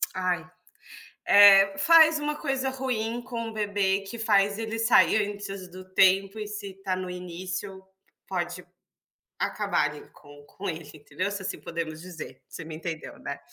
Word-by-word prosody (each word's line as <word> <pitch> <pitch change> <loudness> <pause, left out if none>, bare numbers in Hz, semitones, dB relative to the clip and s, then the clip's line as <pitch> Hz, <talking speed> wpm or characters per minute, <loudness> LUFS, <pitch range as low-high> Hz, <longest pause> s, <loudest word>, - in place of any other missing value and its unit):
ai, 180 -4 -1 0.8
eh, 195 -1 +7
faz 320 +6 +6
uma 300 0 -2
coisa 270 -3 -2
ruim 240 -3 -3
com 235 -2 -5
o 225 - -10
bebê 200 -2 0
que 200 +4 -8
faz 205 -2 +2
ele 225 0 -4
sair 220 -2 +4
antes 200 -2 -7
do 185 +1 -11
tempo 195 +2 +3
e 210 - -4
se 200 -2 -6
tá 185 -1 0
no 185 0 -5
início, 185 +2 -6 0.4
pode 180 -1 -4 0.7
acabarem - - -1
com 145 0 -16
com 195 +5 -7
ele 160 -2 -5
entendeu, 150 +6 -4
se 200 -1 -4
assim 190 - -4
podemos 160 -2 -5
dizer, 175 -3 -10
você 165 - -8
me 160 0 -8
entendeu, 165 -1 -6
né? 140 - -6
195 Hz, 155 wpm, -26 LUFS, 180-220 Hz, 0.8 s, eh